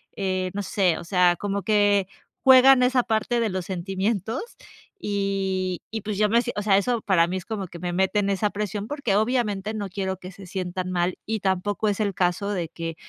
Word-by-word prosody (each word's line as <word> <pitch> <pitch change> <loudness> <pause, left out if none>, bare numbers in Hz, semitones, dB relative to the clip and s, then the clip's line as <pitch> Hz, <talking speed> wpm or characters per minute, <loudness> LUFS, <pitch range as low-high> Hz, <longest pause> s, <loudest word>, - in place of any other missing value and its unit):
eh, 185 -2 -1
no 205 0 -3
sé, 185 -4 +1
o - - -7
sea, 180 0 +3
como 200 +2 -3
que 205 -2 +3 0.4
juegan 260 0 +7
esa 250 0 +3
parte 225 +2 0
de 230 -2 +1
los 185 -2 -3
sentimientos 195 +4 -2 0.6
y 195 - -1
y 220 0 -3
pues 210 0 -4
yo 210 +1 +3
me 230 +2 +4 0.2
o 205 - -1
sea, 200 -2 +4
eso 235 +3 0
para 185 -5 +3
mí 185 +2 -2
es 185 - -7
como 210 -4 -4
que 170 0 -11
me 175 0 -3
meten 195 +2 +1
esa 200 +2 +1
presión, 205 0 -4
porque 280 -7 -1
obviamente 215 -2 0
no 205 -2 -4
quiero 190 0 -3
que 185 +1 -10
se 195 +1 -12
sientan 185 0 -4
mal 175 0 0
y 220 0 -2
tampoco 195 +2 -1
es 205 0 0
el 205 -2 0
caso 180 +2 0
de 180 -5 -2
que 165 0 -5
195 Hz, 205 wpm, -24 LUFS, 185-215 Hz, 0.6 s, juegan